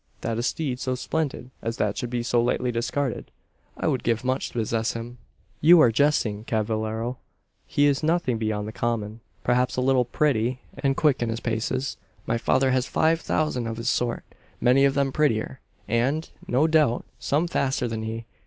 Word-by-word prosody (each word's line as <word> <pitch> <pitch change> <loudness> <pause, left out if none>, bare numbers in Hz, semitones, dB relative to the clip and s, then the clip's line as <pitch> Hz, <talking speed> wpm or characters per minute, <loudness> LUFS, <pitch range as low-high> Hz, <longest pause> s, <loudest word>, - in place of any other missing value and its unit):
"That 115 0 -2
a - - +1
steed 125 +1 -2
so 130 0 -1
splendid 135 -1 -3
as 115 +1 -3
that 105 -3 0
should 125 - -3
be 120 -1 -2
so 120 0 +2
lightly 125 +1 0
discarded. 120 +2 -2 0.5
I - - -3
would 130 - +1
give 115 +1 0
much 130 +1 0
to - - -13
possess 115 -1 -1
him." 115 +1 -7 0.4
"You 170 +3 +7
are 120 -7 +6
jesting, 115 -5 +1
cavallero. 110 +2 -2 0.5
He 145 - +2
is 140 -2 +2
nothing 160 -7 +1
beyond 105 -1 -2
the - - -5
common; 110 -1 -2 0.2
perhaps 125 +1 +1
a - - +2
little 130 -1 +3
pretty, 125 -2 +1 0.2
and 135 -1 0
quick 150 -5 +3
in 120 - 0
his 115 0 -2
paces. 115 +4 -2 0.3
My 115 +1 0
father 130 +3 +2
has 130 0 +1
five 165 +1 +2
thousand 130 -7 -1
of 115 0 -4
his 115 +1 -1
sort 120 -1 0 0.4
many 130 +3 +4
of 135 - +2
them 140 -1 +1
prettier, 130 -3 0 0.3
and, 135 +8 0 0.2
no 130 +5 +3
doubt, 155 -6 +2
some 155 +5 +1
faster 135 -6 0
than 110 -1 -3
he. 110 +1 -5
125 Hz, 185 wpm, -25 LUFS, 115-140 Hz, 0.5 s, You